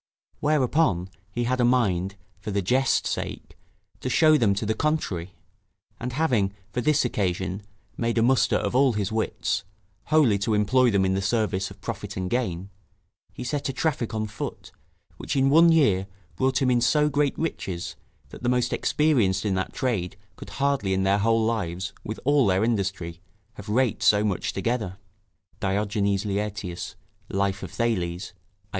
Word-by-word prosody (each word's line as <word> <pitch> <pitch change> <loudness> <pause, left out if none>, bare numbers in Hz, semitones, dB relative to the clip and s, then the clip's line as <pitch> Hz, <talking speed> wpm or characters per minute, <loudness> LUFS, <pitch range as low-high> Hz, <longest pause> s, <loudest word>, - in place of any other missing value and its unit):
Whereupon, 140 - +2 0.2
he 120 +4 -2
had 125 +1 0
a - - +3
mind, 100 -7 +2 0.2
for - - -6
the 100 -1 -1
jest's 130 +8 +2
sake, - - -5 0.4
to 130 - -3
show 155 +4 +5
them 110 -8 +3
to 105 - -2
the 110 - +1
contrary; 105 - -2 0.6
and 125 +1 -4
having, 120 -10 +1 0.2
for 125 - -2
this 150 +1 +2
occasion, 95 -3 -1 0.4
made 115 0 -1
a 115 - +4
muster 130 +2 +3
of - - -1
all 130 -1 +4
his 105 -1 -2
wits, 110 -4 -1 0.4
wholly 145 -10 +3
to 110 +2 0
employ 125 +5 +3
them 100 -3 +2
in 95 - +1
the 95 - 0
service 100 -1 0
of - - -14
profit - - -5
and 95 0 -3
gain, 100 -6 -2 0.6
he - - -7
set 140 +2 -2
a - - -2
traffic 130 -6 -1
on 110 0 -1
foot, 105 -1 -7 0.5
which - - -4
in 135 0 +3
one 165 +3 +7
year 100 - +3 0.3
brought 130 0 +1
him 130 - +3
in 120 -1 +3
so 150 +4 +3
great 145 -1 +1
riches, 90 - -3 0.3
that - - -11
the 120 - 0
most 125 -1 +1
experienced 125 -12 +2
in 100 - +1
that 95 0 -2
trade 100 -7 -2 0.2
could - - -10
hardly 135 -9 0
in 95 - 0
their 100 +1 +3
whole 115 +1 +2
lives, 95 -5 -2
with 110 - -5
all 145 -4 +4
their 95 +2 +2
industry, 95 -7 -2 0.3
have 105 -1 -10
raked 120 +2 +1
so 105 0 +4
much 100 -4 -1
together. 105 -3 -2 0.6
[Diogenes 100 0 0
Laertius, 100 -3 -3 0.3
Life 95 0 -1
of 95 - -6
Thales, 90 -3 -2
i. - - -37
110 Hz, 170 wpm, -25 LUFS, 95-130 Hz, 0.6 s, one